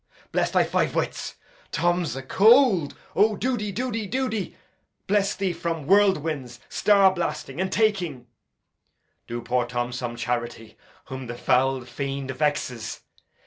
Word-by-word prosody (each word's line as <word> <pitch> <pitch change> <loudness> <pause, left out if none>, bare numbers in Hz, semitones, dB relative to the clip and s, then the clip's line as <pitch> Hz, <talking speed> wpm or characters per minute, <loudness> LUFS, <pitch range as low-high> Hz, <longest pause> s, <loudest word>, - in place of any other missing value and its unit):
Bless - - +1
thy - - +3
five - - 0
wits! - - -2 0.4
Tom 175 +1 +1
's 125 - -4
acold. 195 - +4 0.2
O, 210 +3 +4
do 250 +6 0
de, 210 -3 -3
do 250 +6 -2
de, 220 -2 -3
do 260 +6 -1
de. 215 -4 -4 0.5
Bless 200 0 +1
thee 190 -2 -1
from 165 -4 -3
whirlwinds, 155 -10 +2
star 195 -2 +4
blasting, 170 -3 -3
and 190 - -1
taking! 180 - 0 1.0
Do 120 0 -5
poor 125 0 0
Tom 120 0 -2
some 120 -1 -4
charity, 120 -1 -4 0.3
whom 130 -1 -7
the 120 +1 -6
foul 130 +1 +1
fiend 135 +2 -4
vexes. 130 -5 -2
155 Hz, 145 wpm, -25 LUFS, 125-200 Hz, 1.0 s, acold